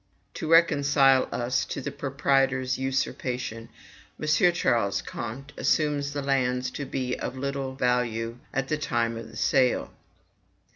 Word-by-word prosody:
To 155 - -5
reconcile 140 -5 +5
us 120 +1 0
to - - -5
the 140 +1 -4
proprietor's 135 -2 +1
usurpation, 125 -3 -2 0.5
M. - - -4
Ch. 175 +3 +3 0.4
Comte 130 +6 -6
assumes 145 -2 +1
the 145 -1 -3
lands 125 -2 0
to 140 - -5
be 130 -2 -2
of 130 - -4
little 135 0 -3
value 120 -2 0
at 135 0 -1
the 155 +1 -1
time 115 -5 0
of 115 0 -8
sale. 130 -2 +2
135 Hz, 130 wpm, -26 LUFS, 125-140 Hz, 0.5 s, reconcile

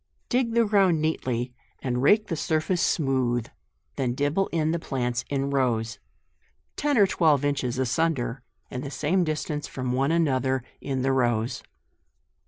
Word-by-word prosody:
Dig 245 -2 +1
the 235 -1 +4
ground 195 -6 +3
neatly, 125 -6 -1 0.3
and 125 -2 -2
rake 210 +10 +5
the 165 - -3
sur 155 0 +1
face 175 +2 -1
smooth; 130 -6 +1 0.5
then 125 -2 0
dibble 145 +8 +1
in 160 -1 0
the 170 - 0
plants 125 -5 -2
in 140 -1 0
JUNE. 140 +1 -2
149 130 -4 +2
rows, 115 +1 -6 0.8
ten 290 -3 +1
or 205 - +7
twelve 155 -7 +2
inches 130 -4 -1
asunder, 130 -2 0 0.3
and 125 - -4
the 140 - -5
same 165 +6 +1
distance 155 -2 -2
from 130 -1 -4
one 135 +4 +1
another 130 -6 +1 0.2
in 135 -2 -2
the 135 - +2
rows. 120 -3 +1
140 Hz, 165 wpm, -26 LUFS, 125-165 Hz, 0.8 s, or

